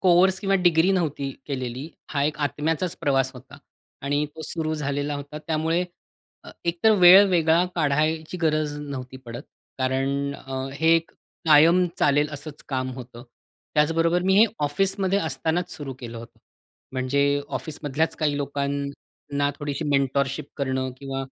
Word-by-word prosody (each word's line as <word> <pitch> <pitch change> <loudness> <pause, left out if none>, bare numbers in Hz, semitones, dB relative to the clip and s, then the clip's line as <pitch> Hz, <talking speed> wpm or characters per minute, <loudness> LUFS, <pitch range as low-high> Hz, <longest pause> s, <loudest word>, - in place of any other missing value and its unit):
Course 185 +1 +4
किंवा 195 -1 +1
degree 175 -1 +4
नव्हती 150 -7 -1 0.2
केलेली. 130 0 -4 0.2
हा 140 -2 -1
एक 150 +1 -1
आत्म्याचाच 160 +5 -2
प्रवास 135 -2 +2
होता. 135 +3 -13 0.4
आणि 145 +2 0
तो 160 - -7
सुरु 155 0 -2
झालेला 145 0 -2
होता. 145 +1 -7
त्यामुळे 165 +2 0 0.6
अ, - - -10
एकतर 170 +6 +2
वेळ 185 +3 +9
वेगळा 165 -1 +3
काढायची 155 +2 0
गरज 155 -2 +1
नव्हती 130 -3 -7
पडत. 120 +2 -7 0.4
कारण 135 +2 -1
अ, 135 -1 -10 0.2
हे 160 +3 +4
कायम 165 +3 +3
चालेल 145 +1 +3
असंच 145 +1 -7
काम 130 -1 -2
होतं. 125 -2 -10 0.5
त्याचबरोबर 165 +3 +2
मी 190 +1 +3
हे 220 - +8 0.2
ऑफिसमध्ये 190 +6 +1
असतानाच 160 +2 -1
सुरू 140 -3 -5
केलं 120 -2 -7
होतं. 115 - -12 0.5
म्हणजे 130 +2 0 0.3
ऑफिसमधल्याच 150 0 -2
काही 150 -2 0
लोकांना 140 0 -3
थोडीशी 145 +1 -3
मेंटरशिप 140 +1 0
करणं 130 -2 -1
किंवा 135 0 -4
145 Hz, 135 wpm, -24 LUFS, 140-165 Hz, 0.6 s, वेळ